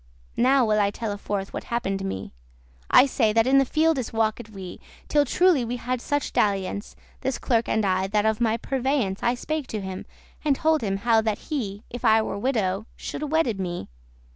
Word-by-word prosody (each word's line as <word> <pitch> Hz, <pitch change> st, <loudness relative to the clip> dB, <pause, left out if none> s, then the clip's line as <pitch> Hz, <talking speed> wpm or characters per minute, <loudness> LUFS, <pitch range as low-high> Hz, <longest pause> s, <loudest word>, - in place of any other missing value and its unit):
*worn -, -, +1 dB
Now 265 Hz, -1 st, +5 dB
will 215 Hz, -1 st, +2 dB
I 200 Hz, -, +3 dB
telle 205 Hz, 0 st, -4 dB
forth 200 Hz, -1 st, -4 dB
what -, -, -5 dB
happen'd 195 Hz, -5 st, -2 dB
me: 100 Hz, -, -5 dB, 0.6 s
I -, -, +7 dB
say, 235 Hz, -5 st, +1 dB
that 225 Hz, 0 st, +4 dB
in 270 Hz, +1 st, +5 dB
the 270 Hz, -, +3 dB
fieldes 310 Hz, -5 st, +1 dB
walked 220 Hz, -1 st, -1 dB
we, 190 Hz, -4 st, -9 dB, 0.3 s
Till 295 Hz, -1 st, +3 dB
truely 350 Hz, -1 st, +3 dB
we 240 Hz, +1 st, -3 dB
had 250 Hz, 0 st, -3 dB
such 290 Hz, +1 st, -2 dB
dalliance, 200 Hz, 0 st, 0 dB, 0.2 s
This 265 Hz, -1 st, -2 dB
clerk 230 Hz, -2 st, 0 dB
and 220 Hz, -1 st, +1 dB
I, 190 Hz, 0 st, +1 dB
that 210 Hz, +1 st, +1 dB
of 220 Hz, +1 st, +1 dB
my 225 Hz, -1 st, +2 dB
purveyance* 260 Hz, -5 st, -1 dB
*foresight 240 Hz, -, +2 dB
I -, -, -4 dB
spake 305 Hz, +2 st, -3 dB
to 215 Hz, -, -4 dB
him, 190 Hz, -1 st, -6 dB, 0.4 s
and 295 Hz, -3 st, +3 dB
told 315 Hz, +2 st, +2 dB
him 195 Hz, -3 st, -1 dB
how 225 Hz, +2 st, +3 dB
that 215 Hz, -1 st, -1 dB
he, 220 Hz, -9 st, -4 dB
If 245 Hz, -, -7 dB
I 220 Hz, -1 st, +5 dB
were 205 Hz, -, -4 dB
widow, 215 Hz, -4 st, 0 dB
shoulde 300 Hz, 0 st, -5 dB
wedde 275 Hz, -10 st, +1 dB
me. 175 Hz, -2 st, -4 dB
225 Hz, 205 wpm, -25 LUFS, 200-265 Hz, 0.6 s, I